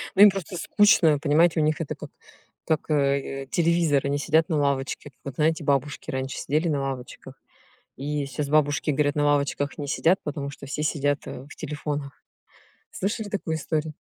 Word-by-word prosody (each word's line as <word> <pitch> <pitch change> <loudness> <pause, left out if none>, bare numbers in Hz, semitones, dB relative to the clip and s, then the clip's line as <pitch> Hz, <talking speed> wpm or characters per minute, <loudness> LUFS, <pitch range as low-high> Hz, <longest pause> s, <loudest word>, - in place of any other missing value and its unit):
Ну, - - +4
им 205 - +11
просто 190 -2 -5
скучно, 170 -7 +4
понимаете, 160 +2 +3
у - - +3
них 155 +1 +1
это 155 - -4
как - - -9 0.6
как, 160 0 -1
э, 140 -2 0
э, - - -12
телевизор 165 -4 +2
они 140 +1 0
сидят 160 +2 +2
на 160 - +1
лавочке. 140 0 -1
Как 125 - -42
вот 140 -2 -6
знаете, 160 0 +1
бабушки 140 +1 -1
раньше 130 0 -3
сидели 155 +4 0
на 145 -3 0
лавочках 135 0 -6 0.6
и 145 +1 -2
щас 140 +2 -4
бабушки 150 0 +2
говорят 145 0 +1
на 145 -1 +1
лавочках 145 0 0
не 145 - -4
сидят, 170 +5 +2
потому 145 -2 -4
что 140 0 -11
все 150 +2 -3
сидят, 145 -2 0
э, 130 - -7
в - - -13
телефонах. 150 -2 -5 0.7
Слышали 205 +2 -3
такую 165 -5 -2
историю? 155 0 -2
150 Hz, 185 wpm, -25 LUFS, 140-160 Hz, 0.7 s, им